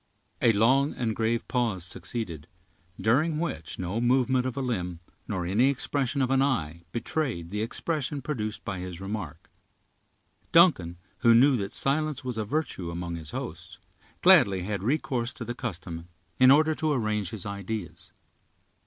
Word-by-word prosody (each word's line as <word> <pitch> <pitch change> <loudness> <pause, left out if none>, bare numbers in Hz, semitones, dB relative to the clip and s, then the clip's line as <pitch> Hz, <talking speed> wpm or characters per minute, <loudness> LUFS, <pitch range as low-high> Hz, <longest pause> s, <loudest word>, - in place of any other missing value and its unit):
A 115 - +6
long 130 +7 +3
and 115 -3 -1
grave 115 +1 0
pause 115 -8 0
succeeded, 90 -4 -5 0.5
during 150 +8 +2
which 145 - -4
no 95 +5 -2
movement 130 +1 +2
of 130 - -5
a - - 0
limb, 90 -9 -2 0.3
nor 95 -5 -2
any 110 +9 +3
expression 140 0 0
of 130 - 0
an 135 0 +4
eye, 85 - 0
betrayed 115 - -2
the 105 +1 -2
expression 145 +5 -2
produced 110 -7 -4
by 95 -5 -3
his 90 -1 -6
remark. 95 -6 -6 1.0
Duncan, 135 - +5 0.2
who 115 -1 +6
knew 135 +3 +6
that 100 -2 -3
silence 150 0 0
was 125 -3 -3
a 110 - -1
virtue 110 - -2
among 85 0 -4
his 80 -2 -7
hosts, - - -6 0.5
gladly 95 -2 +6
had 100 0 -3
recourse 125 0 -1
to 115 - -6
the 120 - -3
custom, 85 -8 -6 0.3
in 130 0 +7
order 155 +3 +6
to 155 0 -1
arrange 105 -6 -1
his 105 -3 -5
ideas. 100 -1 -6
115 Hz, 155 wpm, -27 LUFS, 95-135 Hz, 1.0 s, in